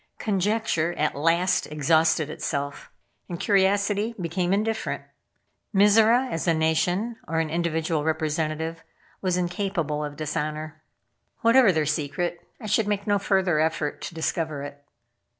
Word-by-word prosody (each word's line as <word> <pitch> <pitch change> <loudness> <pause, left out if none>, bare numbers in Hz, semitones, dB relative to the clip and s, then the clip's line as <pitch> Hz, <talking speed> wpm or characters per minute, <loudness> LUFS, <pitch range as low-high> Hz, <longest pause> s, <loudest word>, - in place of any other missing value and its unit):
Conjecture 200 -4 0
at 155 - 0
last 170 +5 +1
exhausted 160 +1 +2
itself, 145 -2 -4 0.4
and 170 -1 -5
curiosity 200 +2 +2
became 175 +1 -1
indifferent. 220 +3 -1 0.7
Mizora, 220 +5 +5
as 165 - -3
a 165 - +4
nation, 175 +8 0
or 160 - -2
an 160 -1 0
individual 160 -2 -1
representative, 160 +1 -2 0.4
was 185 -2 0
incapable 175 -4 -2
of 145 -1 -5
dishonor. 155 +1 -4 0.6
Whatever 230 -2 +6
their 155 -3 0
secret 155 +4 -2 0.2
I 230 - -9
should 210 0 +1
make 205 -1 -1
no 205 -1 +2
farther 190 -5 +1
effort 155 -2 -1
to 170 - -7
discover 160 -3 -2
it. 145 0 -9
170 Hz, 130 wpm, -25 LUFS, 155-200 Hz, 0.7 s, Whatever